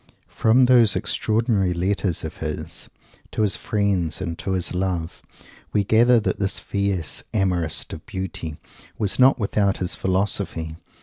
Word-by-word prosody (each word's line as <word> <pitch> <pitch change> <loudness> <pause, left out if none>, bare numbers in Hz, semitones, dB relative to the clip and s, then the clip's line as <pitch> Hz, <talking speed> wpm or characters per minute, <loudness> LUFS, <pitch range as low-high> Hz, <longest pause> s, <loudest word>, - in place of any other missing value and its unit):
From 120 +3 +4
those 120 -5 +5
extraordinary 110 -5 +1
letters 95 0 -1
of 80 - -6
his, 75 -1 -5 0.4
to 110 - 0
his 100 -2 +1
friends 95 -6 0
and 85 -3 -3
to 95 - -2
his 90 -1 -1
love, 90 -2 -2 0.5
we 105 - +3
gather 115 +4 +5
that 105 - -1
this 100 0 0
fierce 100 -5 -2
amorist 90 -6 0
of 80 - -9
Beauty 95 -6 -5 0.4
was 105 +1 -1
not 130 +1 +6
without 100 -2 +1
his 90 0 -3
Philosophy. 95 -4 -1
95 Hz, 140 wpm, -23 LUFS, 90-105 Hz, 0.5 s, not